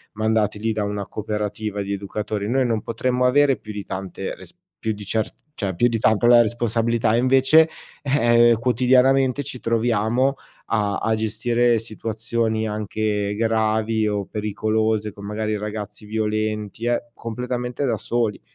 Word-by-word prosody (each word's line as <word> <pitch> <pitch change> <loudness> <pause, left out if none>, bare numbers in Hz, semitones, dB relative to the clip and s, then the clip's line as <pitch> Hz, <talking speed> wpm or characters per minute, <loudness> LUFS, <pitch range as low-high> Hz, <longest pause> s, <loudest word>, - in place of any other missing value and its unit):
mandati 110 -1 +1
lì 110 0 0
da 105 -1 -1
una 100 -1 -3
cooperativa 105 -1 -3
di 100 0 -3
educatori. 105 +1 -3
Noi 130 +1 +2
non 115 -3 0
potremmo 125 +2 -1
avere 135 +1 +4
più 110 - -10
di 105 -1 -6
tante 95 -1 -5
res - - -11 0.3
più 110 -1 -1
di 105 0 -9
cer 110 +2 -1 0.2
cioè, 95 - -3
più 120 - +3
di 115 -1 -1
tanto 110 +1 +3
la 120 0 +8
responsabilità. 115 0 +1
E - - +3
invece, 135 +5 +5 0.3
eh, 120 -5 +4
quotidianamente 130 +3 +3
ci 125 - -7
troviamo 115 +3 +1 0.4
a 105 -2 +1
a 110 - +1
gestire 115 +2 +1
situazioni, 110 0 -2
anche 105 -1 -2
gravi 110 0 +1
o 100 -2 -1
pericolose. 110 0 -1
Con 100 0 -10
magari, 110 +1 -2
ragazzi 105 0 -6
violenti 110 0 -2
e 120 0 -1
completamente 125 +3 -4
da 115 -4 0
soli. 115 -3 -1
110 Hz, 150 wpm, -22 LUFS, 105-120 Hz, 0.4 s, la